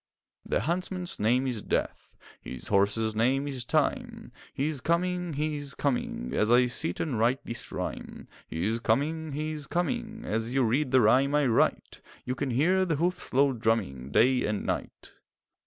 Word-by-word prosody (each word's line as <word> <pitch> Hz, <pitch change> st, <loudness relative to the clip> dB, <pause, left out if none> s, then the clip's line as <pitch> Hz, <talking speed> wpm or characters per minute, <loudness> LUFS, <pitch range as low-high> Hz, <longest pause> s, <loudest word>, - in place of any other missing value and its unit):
The -, -, -1 dB
huntsman's 180 Hz, -, -2 dB
name 120 Hz, +5 st, +2 dB
is 120 Hz, -5 st, -2 dB
Death, -, -, -3 dB, 0.2 s
His 65 Hz, -, -7 dB
horse's 105 Hz, +2 st, +2 dB
name 130 Hz, +6 st, +1 dB
is 130 Hz, -3 st, -3 dB
Time; -, -, -1 dB, 0.2 s
He 135 Hz, -, -2 dB
is 150 Hz, -4 st, -2 dB
coming, 180 Hz, +2 st, 0 dB
he 150 Hz, +1 st, -1 dB
is 145 Hz, -1 st, -4 dB
coming 125 Hz, -, -2 dB
As 105 Hz, -, +1 dB
I 125 Hz, +1 st, +6 dB
sit 120 Hz, -8 st, -1 dB
and 130 Hz, -9 st, -1 dB
write 120 Hz, +4 st, +1 dB
this 115 Hz, -, -6 dB
rhyme; -, -, -6 dB, 0.2 s
He 80 Hz, +3 st, -3 dB
is 115 Hz, +2 st, 0 dB
coming, 150 Hz, +7 st, 0 dB
he 155 Hz, +2 st, -2 dB
is 150 Hz, -3 st, -5 dB
coming, 225 Hz, +5 st, -2 dB
As 115 Hz, +3 st, -2 dB
you 135 Hz, -, +3 dB
read 130 Hz, +5 st, +1 dB
the 130 Hz, 0 st, +5 dB
rhyme 130 Hz, +6 st, +4 dB
I 150 Hz, -1 st, +3 dB
write; 120 Hz, -3 st, +1 dB, 0.2 s
You 125 Hz, -, -1 dB
can 130 Hz, +1 st, -3 dB
hear 170 Hz, +10 st, +2 dB
the 170 Hz, -4 st, 0 dB
hoofs' 175 Hz, +5 st, -2 dB
low 135 Hz, +1 st, +3 dB
drumming 110 Hz, -, -1 dB
Day 125 Hz, -, +3 dB
and 105 Hz, -1 st, -2 dB
night. -, -, -4 dB
130 Hz, 175 wpm, -28 LUFS, 115-155 Hz, 0.2 s, I